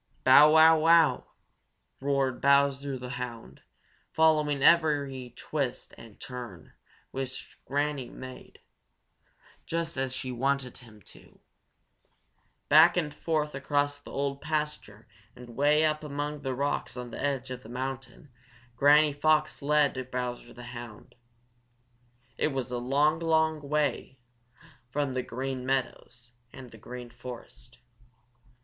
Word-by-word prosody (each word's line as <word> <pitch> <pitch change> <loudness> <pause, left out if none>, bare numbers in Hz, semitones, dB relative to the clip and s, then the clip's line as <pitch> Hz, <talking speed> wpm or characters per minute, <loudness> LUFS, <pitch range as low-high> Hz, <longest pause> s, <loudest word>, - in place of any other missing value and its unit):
"Bow, 145 +4 +8
wow, 160 0 +7
wow!" 160 -4 +4 0.7
roared 135 -2 -1
Bowser 140 -1 +2
the 125 0 -7
Hound, 115 - -8 0.5
following 150 -3 +2
every 140 -7 +2
twist 140 -5 -4
and 115 -3 -15
turn 120 -8 -9 0.4
which 130 -1 -6
Granny 145 -2 -2
Fox - - -14
made, 130 0 -11 1.1
just 165 -2 -3
as 130 -1 -1
she 130 0 -4
wanted 130 +1 -2
him 110 -5 -17
to. - - -17 1.3
Back 160 +4 +6
and 150 -4 -1
forth 150 -1 -2
across 145 +1 -1
the 145 - -14
old 140 0 -3
pasture 150 -9 -4 0.3
and 120 -2 -12
way 150 +4 +3
up 155 0 -1
among 145 0 -4
the 135 -2 -3
rocks 140 -1 -2
on 125 -1 -7
the - - -7
edge 135 -2 -2
of 125 0 -6
the 110 - -13
mountain 130 +1 -6 0.4
Granny 145 +3 +5
Fox 155 +1 +1
led 140 -3 +1
Bowser 125 -1 -4
the 125 - -11
Hound. 120 -3 -10 1.3
It - - +2
was 135 -4 -4
a 125 - -2
long, 145 +5 +2
long, 160 -1 +1
long 145 -1 -12
way 145 -3 -1 0.7
from 140 +1 -2
the 130 - -1
Green 130 +1 -5
Meadows 125 -2 -3 0.2
and 130 -3 -12
the 115 - -14
Green 125 +1 -9
Forest. 120 0 -11
135 Hz, 130 wpm, -28 LUFS, 125-150 Hz, 1.3 s, Bow